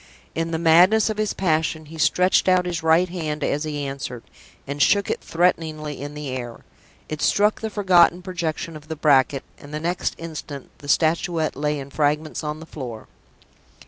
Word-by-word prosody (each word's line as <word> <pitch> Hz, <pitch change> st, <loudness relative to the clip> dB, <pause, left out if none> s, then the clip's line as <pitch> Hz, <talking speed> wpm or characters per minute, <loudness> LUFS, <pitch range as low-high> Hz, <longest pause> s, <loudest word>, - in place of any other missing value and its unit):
In 165 Hz, 0 st, -2 dB
the 165 Hz, -, -1 dB
madness 180 Hz, +7 st, +5 dB
of 215 Hz, -, -5 dB
his 215 Hz, -1 st, 0 dB
passion, 160 Hz, -3 st, 0 dB
he 160 Hz, +2 st, -11 dB
stretched 180 Hz, +4 st, +3 dB
out 185 Hz, -1 st, +4 dB
his 175 Hz, -2 st, -2 dB
right 160 Hz, +3 st, +4 dB
hand 160 Hz, -4 st, -4 dB
as 150 Hz, +2 st, 0 dB
he 145 Hz, -2 st, -3 dB
answered, 135 Hz, -3 st, -6 dB, 0.4 s
and 140 Hz, +1 st, -4 dB
shook 200 Hz, +4 st, +3 dB
it -, -, -3 dB
threateningly 155 Hz, -4 st, -1 dB
in 145 Hz, +1 st, -6 dB
the 150 Hz, -2 st, -5 dB
air. 120 Hz, -2 st, -6 dB, 0.4 s
It 155 Hz, 0 st, -5 dB
struck 210 Hz, +1 st, +2 dB
the 220 Hz, -, -2 dB
forgotten 180 Hz, -4 st, +4 dB
projection 170 Hz, -2 st, -4 dB
of 155 Hz, 0 st, -11 dB
the 160 Hz, -, -4 dB
bracket 140 Hz, -2 st, +3 dB, 0.2 s
and 145 Hz, -, -12 dB
the 150 Hz, -, -3 dB
next 175 Hz, +3 st, -2 dB
instant 155 Hz, -4 st, -8 dB
the 145 Hz, -, -11 dB
Statuette 160 Hz, +1 st, +1 dB
lay 150 Hz, +2 st, -1 dB
in 140 Hz, 0 st, -8 dB
fragments 150 Hz, +2 st, 0 dB
on 150 Hz, 0 st, -4 dB
the 160 Hz, -, -10 dB
floor. 125 Hz, -8 st, -8 dB
160 Hz, 180 wpm, -23 LUFS, 145-175 Hz, 0.4 s, madness